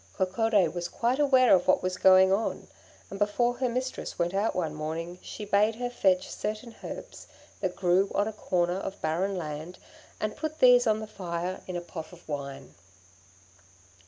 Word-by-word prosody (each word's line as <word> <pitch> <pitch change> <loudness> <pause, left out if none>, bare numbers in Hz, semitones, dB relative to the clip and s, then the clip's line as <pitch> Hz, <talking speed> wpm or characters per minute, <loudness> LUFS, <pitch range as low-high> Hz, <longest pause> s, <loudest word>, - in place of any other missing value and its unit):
Coccodé 195 0 +2
was 175 -1 -3
quite 245 +8 -1
aware 260 -4 +5
of 185 - +3
what 185 - +3
was 185 0 -1
going 190 0 +6
on, 215 +3 -2 0.4
and 195 - -6
before 240 +4 +1
her 255 0 0
mistress 255 +2 -4
went 175 +1 0
out 200 +3 0
one 165 -4 -1
morning 165 +3 -5
she 210 - -7
bade 205 +2 +3
her 245 +1 -3
fetch 185 -6 +2
certain 215 +3 -5
herbs - - -8 0.3
that 185 -2 -2
grew 185 +2 +2
on 205 - +2
a 220 - -4
corner 180 -3 0
of 195 +1 -6
barren 185 +5 -1
land, 155 +2 -6 0.4
and 215 0 -2
put 310 0 -4
these 245 -2 +6
on 215 0 +2
the - - -4
fire 180 -3 -4
in 185 - -5
a 175 - -2
pot 165 -2 -8
of 175 -1 -16
wine. 140 - -6
190 Hz, 180 wpm, -28 LUFS, 175-220 Hz, 0.4 s, going